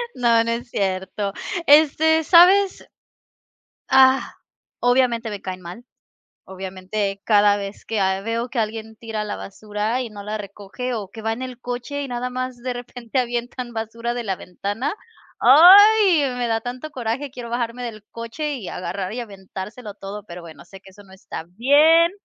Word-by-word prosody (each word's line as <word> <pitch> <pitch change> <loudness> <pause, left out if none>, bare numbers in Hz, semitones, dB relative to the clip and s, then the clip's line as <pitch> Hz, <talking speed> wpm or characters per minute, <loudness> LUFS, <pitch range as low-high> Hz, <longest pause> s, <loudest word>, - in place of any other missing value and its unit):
no 235 -2 +3
no 230 - -2
es 240 +1 -4
cierto, 195 0 -2 0.3
este, 315 +2 +5
¿sabes? 370 +4 +5 1.1
¡Ah! 265 0 +5 0.5
Obviamente 245 -2 +2
me 205 - -6
caen 185 -1 -6
mal, 180 +8 -10 0.6
obviamente 190 +1 -4
cada 205 -1 +5
vez 200 0 -7
que, 225 -2 -2
ah, 190 0 +1
veo 230 +3 -3
que 245 - -3
alguien 220 0 -4
tira 220 -2 -4
la 210 - -4
basura 210 +4 -3
y 245 - -5
no 205 -1 -10
la 210 +1 -4
recoge 205 +5 -6
o 210 -4 -4
que 220 - -10
va 225 +1 -1
en 235 - -8
el 255 -2 -7
coche 245 +4 -4
y - - -5
nada 245 +1 -3
más 255 0 -4
de 250 +1 -4
repente 245 0 -4
avientan 245 0 -3
basura 230 +1 -4
de 240 - -4
la 195 -4 -2
ventana, 205 - -4 0.5
¡ay!, 370 - +8
me 245 -1 -1
da 225 -1 0
tanto 250 +5 -6
coraje, 250 +3 -3
quiero 245 -3 -8
bajarme 240 +1 -3
del 220 -3 -7
coche 235 +6 -4
y 220 -8 -8
agarrar 190 +2 -4
y 250 - -4
aventárselo 205 +1 -9
todo, 200 +1 -8
pero 180 -3 -10
bueno, 165 -1 -12
sé 195 +2 -13
que - - -16
eso 205 +2 -16
no 190 -1 -18
está 190 -3 -8
bien. 295 - +4
230 Hz, 175 wpm, -22 LUFS, 205-255 Hz, 1.1 s, ay